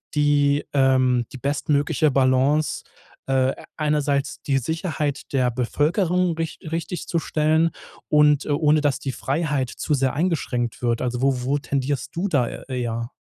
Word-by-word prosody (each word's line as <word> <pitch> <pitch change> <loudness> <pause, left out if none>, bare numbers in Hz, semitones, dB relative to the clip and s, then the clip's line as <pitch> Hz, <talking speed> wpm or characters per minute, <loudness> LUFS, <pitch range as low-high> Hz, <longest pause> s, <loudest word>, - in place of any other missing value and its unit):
die, 145 -1 +3
ähm, 130 -3 +3
die 130 - -8
bestmögliche 145 +2 +1
Balance, 135 +3 +2 0.4
äh, 135 0 +2 0.2
einerseits 145 -2 0
die 135 -2 +1
Sicherheit 150 -1 -3
der 130 -2 +2
Bevölkerung 170 - +1
rich 165 -1 -4
richtigzustellen 165 -1 0 0.4
und, 150 -1 +4
äh, - - -7
ohne 150 +1 +3
dass 145 -3 +1
die 135 - -3
Freiheit 140 -1 -1
zu 150 - -1
sehr 135 -1 +1
eingeschränkt 135 -9 -1
wird. 120 -1 +1
Also, 125 0 -2
wo 135 -2 +2
wo 135 +3 +1
tendierst 140 -1 -3
du 180 +4 -1
da 140 -10 +1
e - - -7 0.2
eher? 115 +1 -3
145 Hz, 140 wpm, -23 LUFS, 130-155 Hz, 0.4 s, und